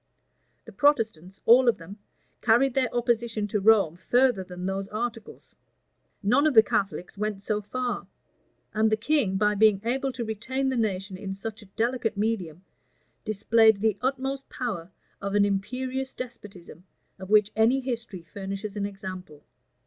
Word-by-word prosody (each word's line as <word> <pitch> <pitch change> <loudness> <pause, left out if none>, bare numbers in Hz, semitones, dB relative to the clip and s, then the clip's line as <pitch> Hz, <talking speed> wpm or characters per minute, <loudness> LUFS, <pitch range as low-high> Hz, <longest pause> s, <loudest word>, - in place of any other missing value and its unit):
The - - -11
Protestants, 220 - +1
all 245 +2 +7
of 225 - +1
them, 185 +5 -11 0.4
carried 240 +4 +4
their 260 -2 +1
opposition 235 -3 0
to 210 - 0
Rome 200 -5 +4
further 245 +1 +2
than 180 0 -8
those 195 +1 -2
articles; 225 +1 -6 0.7
none 255 +9 +4
of 295 - 0
the 220 - +9
Catholics 200 -4 -2
went 210 -2 -3
so 210 0 -1
far: 245 +4 -3 0.7
and 220 0 +2
the 215 - +3
king, 230 -5 +1
by 210 +1 +2
being 210 -1 +4
able 265 +3 0
to 240 -2 -4
retain 245 +5 -2
the 260 - -1
nation 195 -4 -2
in 195 0 -5
such 220 +3 -7
a 210 - -15
delicate 225 +2 -1
medium, 190 -6 -2 0.6
displayed 220 0 +4
the 215 -1 +2
utmost 270 +1 -2
power 200 -9 -4 0.3
of 200 0 -3
an 205 0 +5
imperious 255 +7 -2
despotism 200 -9 -9 0.4
of 190 0 -9
which 210 -1 +4
any 225 +5 +4
history 235 -8 -5
furnishes 195 +4 -6
an 200 -1 -1
example. 185 -6 -9
215 Hz, 155 wpm, -26 LUFS, 195-240 Hz, 0.7 s, the